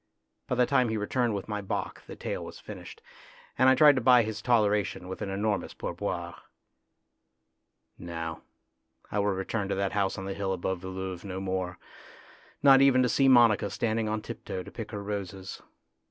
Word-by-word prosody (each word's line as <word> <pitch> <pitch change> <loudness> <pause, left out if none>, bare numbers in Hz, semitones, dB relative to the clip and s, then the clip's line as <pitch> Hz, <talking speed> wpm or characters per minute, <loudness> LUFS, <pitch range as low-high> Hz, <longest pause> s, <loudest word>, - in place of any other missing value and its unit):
By - - 0
the 125 0 +4
time 125 -1 +2
he 110 - -1
returned 115 +2 0
with 100 - -5
my 105 -1 -3
bock 95 - -4
the - - -8
tale - - -4
was - - -9
finished, - - -10 0.5
and 130 - +5
I 130 - +6
tried 150 +1 +7
to - - +1
buy 125 0 +6
his 110 0 -5
toleration 105 -5 +1
with 95 - -7
an 100 - -3
enormous 100 +1 -2
pourboire. - - -4 1.7
No; 85 -1 -5 0.7
I 105 - 0
will 100 - +1
return 100 +1 -2
to - - 0
that 100 0 -1
house 100 -2 0
on 95 - -5
the 95 - -3
hill 95 -1 -2
above 95 0 -3
Woluwe 95 -1 -5
no 95 -2 -5
more, 95 -2 -3 0.9
not 135 -1 +8
even 130 -2 +5
to 125 - +2
see 135 +4 +3
Monica 120 -5 +5
standing 110 0 -1
on 110 0 -2
tiptoe 95 - -6
to - - -11
pick 115 -3 -7
her 105 -3 -5
roses. 100 -2 -5
105 Hz, 185 wpm, -28 LUFS, 95-115 Hz, 1.7 s, not